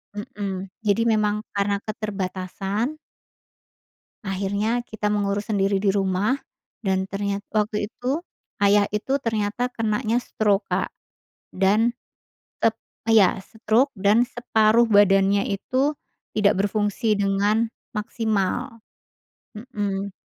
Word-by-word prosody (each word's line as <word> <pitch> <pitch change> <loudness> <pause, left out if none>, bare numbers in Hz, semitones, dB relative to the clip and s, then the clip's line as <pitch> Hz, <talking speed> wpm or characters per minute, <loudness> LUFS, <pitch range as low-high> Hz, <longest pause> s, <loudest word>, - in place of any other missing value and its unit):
Mhm, 200 -3 -5
jadi 210 +1 +2
memang 215 -1 +1
karena 200 0 +1
keterbatasan 200 +4 -3 1.3
akhirnya 200 +5 -1
kita 215 -2 -2
mengurus 205 0 -1
sendiri 195 -2 +1
di 205 - +2
rumah 195 +5 +1 0.5
dan 190 0 0
ternyat 200 0 -2
waktu 210 -1 0
itu 260 +7 -2 0.4
ayah 205 0 +5
itu 265 +6 0
ternyata 225 -2 -1
kenanya 225 +2 0
stroke 210 -3 0
Kak, - - -1 0.6
dan 210 +5 +3 0.7
tet 225 0 +2 0.3
iya, 200 -4 +5
stroke 225 +6 +1
dan 205 +4 +4
separuh 235 -2 +3
badannya 200 -1 +4
itu 260 +9 0 0.4
tidak 210 -2 +3
berfungsi 205 +1 0
dengan 205 +3 +2 0.2
maksimal, 225 +2 -2 0.8
mhm. 200 -4 -3
210 Hz, 100 wpm, -24 LUFS, 200-225 Hz, 1.3 s, ayah